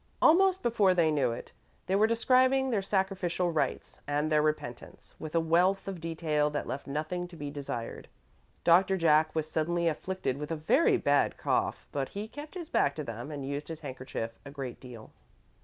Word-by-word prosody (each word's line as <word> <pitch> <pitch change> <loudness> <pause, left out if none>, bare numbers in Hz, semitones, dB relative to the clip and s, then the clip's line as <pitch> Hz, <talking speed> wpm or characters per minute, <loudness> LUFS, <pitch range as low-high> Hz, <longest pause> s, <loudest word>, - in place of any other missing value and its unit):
Almost 375 +3 +5
before 205 -6 +3
they 165 -3 +3
knew 135 -5 +2
it, 115 - -7 0.3
they 190 - 0
were 210 +2 +4
describing 255 +3 +3
their 210 -4 +1
sacrificial 190 -3 0
rites 160 - -2
and 145 +2 0
their 150 0 +4
repentance, 150 -6 -4
with 155 +1 -6
a - - +5
wealth 175 +5 +2
of 190 -4 -5
detail 160 -2 0
that 145 0 -3
left 140 - -5
nothing 155 +5 -3
to 175 - -13
be 145 -2 -6
desired. 135 -5 -6 0.6
Doctor 185 +3 +5
Jack 155 -2 +3
was 155 -1 -1
suddenly 170 +2 0
afflicted 165 -3 -2
with 150 - -5
a 165 - -1
very 160 - +3
bad - - +2
cough, - - -1
but 135 -2 -2
he 205 +2 -5
kept 295 +8 -10
his 345 -3 -6
back 140 - +1
to 155 - -4
them 120 +2 -6
and 145 -3 -5
used 145 +1 -4
his 160 -1 -7
handkerchief 130 -5 -5
a - - -9
great 135 -3 -6
deal. 120 -4 -11
160 Hz, 190 wpm, -30 LUFS, 145-190 Hz, 0.6 s, Almost